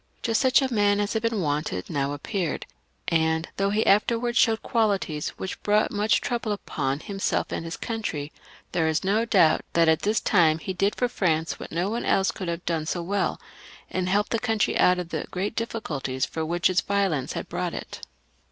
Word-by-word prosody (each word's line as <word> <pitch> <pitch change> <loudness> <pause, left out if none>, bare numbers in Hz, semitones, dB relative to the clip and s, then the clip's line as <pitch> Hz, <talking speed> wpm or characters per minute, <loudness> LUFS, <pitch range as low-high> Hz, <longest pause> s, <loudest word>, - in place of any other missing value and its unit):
Just 225 -2 +1
such 260 +1 +4
a 260 -2 -1
man 205 -1 +3
as 205 0 0
had 220 - 0
been 230 -3 0
wanted 145 - -2
now 140 -2 -1
appeared, 165 +3 -3 0.4
and 160 -1 +1
though 195 0 +1
he 210 +2 +1
afterwards 235 +4 +2
showed 225 -2 +3
qualities 200 -9 0
which 190 - -5
brought 210 +1 +2
much 210 +1 +2
trouble 235 -3 -2
upon 140 -8 -3
himself 195 -1 -2
and - - -3
his 165 +1 -5
country, 190 - -4 0.4
there 165 -3 +1
is 160 +3 0
no 210 +4 +2
doubt 180 -8 +4
that 165 -1 +4
at 160 -1 +3
this 215 +2 +1
time 165 -5 +3
he 190 +3 -5
did 195 +3 +1
for 245 - +1
France 165 -8 0
what - - -8
no 175 +3 0
one 230 +3 -2
else 190 -1 +2
could 185 - -6
have 170 +1 -4
done 160 -2 -1
so 175 0 -2
well, 200 +3 -1 0.5
and 185 0 -1
helped 205 +3 +1
the 230 - +1
country 225 -3 0
out 180 0 +4
of 180 -2 -4
the - - -4
great 195 +4 -3
difficulties 145 - -2
into 160 - -4
which 175 +1 +2
its 185 -1 +2
violence 195 -9 0
had - - -5
brought - - -3
it. - - -7
190 Hz, 200 wpm, -25 LUFS, 160-215 Hz, 0.5 s, such